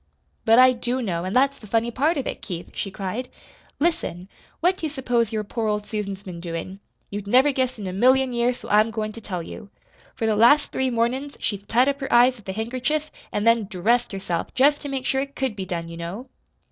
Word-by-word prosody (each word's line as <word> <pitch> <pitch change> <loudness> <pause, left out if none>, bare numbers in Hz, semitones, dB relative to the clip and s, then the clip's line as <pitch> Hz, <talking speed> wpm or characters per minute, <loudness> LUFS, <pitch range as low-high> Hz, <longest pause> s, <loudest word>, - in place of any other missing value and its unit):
"But 225 +1 +6
I 255 0 +8
do 245 +1 -2
know, 180 -7 -2
an' 185 - -3
that's 275 +2 +3
the 215 - -12
funny 230 +3 +1
part 300 +7 +1
of 275 - -2
it, - - -4
Keith," 175 -2 -6
she 195 - -3
cried. 200 +6 -4 0.5
"Listen! 200 - -1 0.3
What 360 +3 +2
do 320 - -2
you - - -5
s'pose 245 -6 0
your 215 -1 -1
poor 220 +2 -3
old 210 0 -1
Susan's 200 -2 -4
been 180 -4 -8
doin'? 170 +3 -5 0.3
You'd 205 0 -5
never 260 +7 +5
guess 260 -2 -1
in 205 - -6
a 185 - -4
million 255 +5 +3
years, 240 +1 +1
so - - -11
I'm 215 +2 +4
goin' 215 -1 -3
to 230 - -10
tell 180 -5 -4
you. 200 +4 -9 0.5
For 225 - -2
the 220 -1 +2
last 240 +7 +5
three 260 0 0
mornin's 250 +4 -1
she's 205 -1 -3
tied 245 +4 +3
up 280 0 0
her 270 -1 -4
eyes 245 +2 +5
with 205 -3 -12
a - - -2
handkerchief 255 +8 -2 0.2
an' 205 - -1
then 230 -1 +4
DRESSED 225 +6 +1
herself, 190 -3 -3
jest 290 +3 +4
to 285 - -5
make 265 -1 -3
sure 265 - +1
it 275 0 -6
COULD 265 -5 -1
be 190 -2 -4
done, 170 -3 -4
you 165 0 -8
know." 180 +10 -6
230 Hz, 235 wpm, -24 LUFS, 200-260 Hz, 0.5 s, I